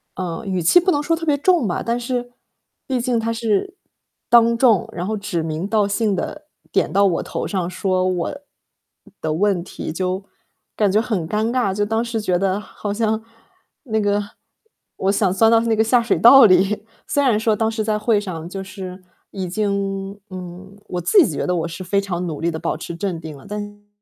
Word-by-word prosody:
呃， 180 +3 -4
语 185 -2 -1
气 170 - +6
不 365 +1 +1
能 290 - +1
说 330 +3 +1
特 330 0 -6
别 295 -2 +3
重 345 -3 +3
吧， 175 - -1
但 235 +1 -1
是 245 0 -3 0.5
毕 260 -2 -1
竟 245 0 0
他 225 0 -1
是 230 - -1 0.5
当 235 -1 +5
众， 230 -6 +3
然 175 +1 -4
后 220 - -1
指 200 -4 -3
名 160 +3 -3
道 210 -1 +2
姓 205 0 0
地 300 +10 -4 0.3
点 - - +1
到 200 0 +4
我 180 -3 +1
头 - - -4
上 185 -3 -2
说 185 0 0
我 185 +5 -1 0.8
的 155 - -1
问 190 0 +1
题， 165 -3 -6
就， 185 +2 -2 0.5
感 205 -3 +2
觉 210 - +3
很 210 -9 -2
尴 215 +5 0
尬， 245 -7 +1
就 205 +1 0
当 225 +2 0
时 230 -1 -3
觉 185 -4 +1
得 195 +1 0
好 210 -1 -6
像 220 0 0 0.6
那 220 -4 -1
个 205 0 +1 0.8
我 195 +1 +1
想 200 -2 +2
钻 225 +3 +4
到 225 0 +5
那 230 -1 +1
个 220 - +2
下 240 +2 +3
水 230 - +1
道 265 +2 +9
里， 195 +2 +3 0.2
虽 285 - +1
然 240 -6 +3
说 220 -1 +2
当 220 +1 0
时 220 0 -2
在 215 0 0
会 215 0 +2
上 175 -5 -6
就 195 +1 -5
是 190 -1 -8 0.3
已 190 -2 -4
经 200 0 -2
嗯， 185 +2 -9
我 180 - -3
自 375 - +5
己 - - -3
觉 - - -2
得 180 - +1
我 165 -2 -1
是 170 +2 -8
非 200 +2 +1
常 180 -2 -3
努 155 -3 -5
力 170 +1 +1
地 160 - -5
保 165 -1 -2
持 170 - -7
镇 180 -2 -3
定 155 -2 -8
了， 135 - -16
但 210 0 -4
心 205 - -7
里 205 - -19
真 - - -29
的 - - -38
205 Hz, 235 characters per minute, -21 LUFS, 185-225 Hz, 0.8 s, 道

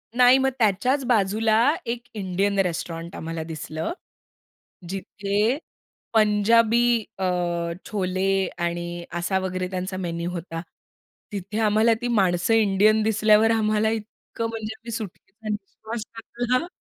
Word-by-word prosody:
नाही. 250 +1 +7
मग 265 0 +3
त्याच्याच 245 +6 +2
बाजूला 220 -1 +2 0.3
एक 235 0 -3
इंडियन 200 0 0
रेस्टॉरंट 170 -2 -2
आम्हाला 165 0 -4
दिसलं. 160 - -4 1.0
जिथे 200 +5 -1 0.6
पंजाबी 220 +2 +4 0.4
अ, 190 - -1 0.6
छोले 190 -3 -1 0.3
आणि 175 0 -3
असा 175 +2 0
वगैरे 185 -1 -2
त्यांचा 185 0 -3
मेनू 170 -1 -3
होता. 165 -1 -5 0.7
तिथे 200 +1 -4
आम्हाला 215 +2 +4
ती 245 - -2
माणसं 190 -2 +2
इंडियन 215 0 +4
दिसल्यावर 215 0 +4
आम्हाला 215 -1 +2
इतकं 225 +1 -5
म्हणजे 220 -1 -5
आम्ही 235 - -10
सुटकेचा 215 0 -7
निश्वास 215 +2 -5
टाकला 240 +2 -1
ना 335 - -4
210 Hz, 120 wpm, -24 LUFS, 185-225 Hz, 1.0 s, नाही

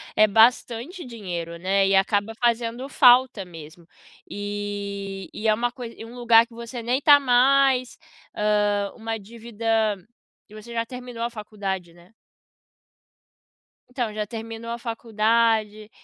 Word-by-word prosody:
é 215 - +5
bastante 240 - +2
dinheiro, 175 -8 -6
né, 195 +2 +1
e 195 - +3
acaba 205 +3 +1
fazendo 235 +2 -1
falta 250 -5 +5
mesmo, 165 0 -13 0.4
e 200 -1 -5
e 220 - -3
é 215 - +5
uma 240 +3 -1
coisa 240 -2 -9
e - - -9
um 230 - -12
lugar 235 -2 +5
que 235 - -20
você 235 +1 -7
nem 250 +4 0
tá 290 0 +7
mais, 260 0 +3 0.4
hã, 205 -1 +1
uma 225 0 -4
dívida, 230 +1 -11 0.8
e - - -16
você 215 +2 -11
já 230 0 -1
terminou 250 -1 -7
a 235 - -1
faculdade, 200 -5 -5
né? 175 +4 -21 1.8
Então, 245 -4 -3
já 210 0 -3
terminou 225 +1 -7
a 235 - -3
faculdade, 225 -2 0
225 Hz, 140 wpm, -24 LUFS, 205-240 Hz, 1.8 s, tá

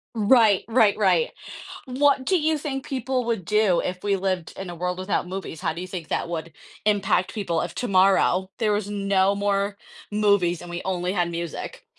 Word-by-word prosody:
Right, 220 -2 +4
right, 225 -3 +4
right. 215 - +2 0.5
What 270 +1 +2
do 370 - +3
you 310 0 +1
think 270 -2 -4
people 260 -1 -2
would 230 -5 -1
do 210 -1 +2
if 180 0 -4
we 200 -1 +2
lived 185 -3 -2
in 190 -2 -7
a 175 - -7
world 180 +2 -3
without 185 -1 -1
movies? 185 -3 -6
How - - -1
do 170 - -6
you 185 - -6
think 175 -3 -7
that - - -2
would 165 -1 -4 0.3
impact 200 -3 +1
people 175 -7 -1
if 175 - -4
tomorrow 190 -3 +2
there 220 -3 +2
was 205 -1 -1
no 195 -1 +2
more 200 0 0 0.4
movies 200 -5 +2
and 175 - -9
we 175 0 -5
only 180 -1 -1
had 175 -3 0
music? 170 -2 -6
195 Hz, 190 wpm, -24 LUFS, 180-215 Hz, 0.5 s, Right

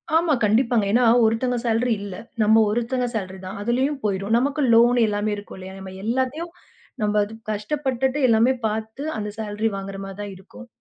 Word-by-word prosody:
ஆமா, 325 -2 +3
கண்டிப்பாங்க. 225 0 +3
ஏன்னா 245 +3 +4 0.2
ஒருத்தங்க 245 +3 +1
சாலரி 230 +1 +2
இல்ல. 200 -2 -6 0.3
நம்ம 220 +1 +5
ஒருத்தங்க 240 +3 -1
சாலரி 190 -3 -4
தான். 185 - -6
அதுலயும் 260 +6 0
போயிடும். 200 +2 0
நமக்கு 285 +4 0
லோன் 240 +2 +5
எல்லாமே 210 0 -1
இருக்கும் 205 -1 -10
இல்லையா? 190 +1 -9
நம்ம 190 -1 -9
எல்லாத்தையும் 260 +9 -1 0.5
நம்ம 210 0 +2 0.3
கஷ்டப்பட்டுட்டு 265 +4 -1
எல்லாமே 230 +3 +4
பார்த்து 220 +5 -4
அந்த 210 -1 -3
சாலரி 215 +1 -1
வாங்குற 195 0 -6
மாரிதான் 195 +1 -7
இருக்கும். 200 +6 -13
220 Hz, 155 wpm, -23 LUFS, 205-250 Hz, 0.5 s, நம்ம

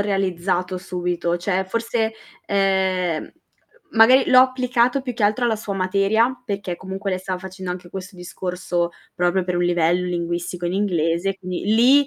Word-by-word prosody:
realizzato 185 -2 -1
subito, 175 -2 -2
cioè 185 +2 -1
forse, 230 +2 -1 0.3
ehm, 190 -4 0 0.6
magari 250 +4 +6
l'ho 255 - +8
applicato 255 0 +2
più 255 -2 -4
che 230 - -4
altro 210 +4 +2
alla 230 - +2
sua 210 -2 -5
materia 200 +6 +1
perché 200 -5 -3
comunque 190 +2 -5
lei 185 - -1
stava 185 -1 -3
facendo 185 0 -7
anche 180 0 -6
questo 190 +1 -8
discorso 180 -1 -3 0.2
proprio 180 +1 +1
per 180 -1 -1
un 175 - +1
livello 175 +1 +2
linguistico 175 0 -3
in 175 - -1
inglese, 185 -1 0
quindi 185 -1 -5
lì 265 +5 +6
190 Hz, 155 wpm, -22 LUFS, 180-210 Hz, 0.6 s, l'ho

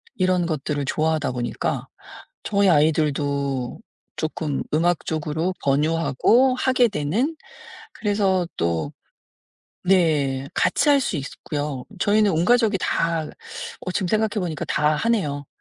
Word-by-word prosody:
이런 185 -2 +1
것들을 150 -2 -2
좋아하다 155 0 0
보니까 120 -1 -3 0.6
저희 200 -2 +2
아이들도 145 -4 +1 0.4
쪼끔 155 -2 -2
음악 170 +1 +1
쪽으로 160 +3 -1
권유하고 165 - +3
하게 255 -1 +3
되는 210 - -1 0.7
그래서 195 -4 +1
또 85 -3 -1 0.9
네 150 -7 +2
같이 - - +2
할 280 - +5
수 220 - -1
있고요. 145 -1 -4 0.2
저희는 210 -1 +3
온 160 +2 +1
가족이 225 -2 +3
다 165 -2 0 0.6
어 185 - -5
지금 185 - -1
생각해 215 +3 +2
보니까 165 -5 -3
다 150 0 +2
하네요. 150 -11 -1
160 Hz, 255 characters per minute, -23 LUFS, 145-195 Hz, 0.9 s, 할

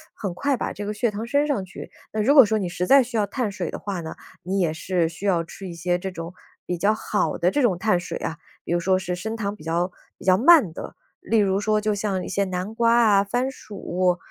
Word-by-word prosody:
很 195 -4 -4
快 280 +7 0
把 - - -3
这 205 - -6
个 210 - -3
血 225 +1 0
糖 210 +3 -5
升 285 +5 +2
上 260 -11 -1
去。 185 - -10 0.2
那 215 - 0
如 275 +7 +4
果 270 -6 +9
说 220 +1 +1
你 185 -4 -2
实 180 +1 -3
在 275 -1 +7
需 235 -1 -4
要 205 -1 +1
碳 225 -1 -2
水 190 -4 -4
的 - - -5
话 195 -3 -4
呢， 160 -1 -6 0.3
你 195 +2 -1
也 165 -3 +1
是 170 0 -1
需 170 +4 -9
要 175 -4 +2
吃 190 +3 -9
一 175 - -7
些 175 +1 -1
这 190 - -4
种， 165 0 -7 0.3
比 180 - -2
较 205 +5 +2
好 215 -1 -1
的 175 +2 +2
这 290 - +1
种 200 -8 +2
碳 180 -2 +2
水 175 - -5
啊， 165 - -4 0.3
比 - - -6
如 175 - +2
说 185 +2 +2
是 180 -1 -3
升 220 +5 -4
糖 205 -2 -3
比 165 - -14
较 170 +3 0 0.3
比 - - -14
较 185 0 +4
慢 270 - +6
的， - - -8 0.2
例 225 -1 +1
如 195 -1 +2
说 215 0 +1
就 215 0 0
像 200 -2 -2
一 - - -6
些 200 0 0
南 185 +3 -4
瓜 230 0 +3
啊、 200 -3 +5
番 245 +6 -1
薯， 180 -6 -2
195 Hz, 280 characters per minute, -24 LUFS, 180-220 Hz, 0.3 s, 果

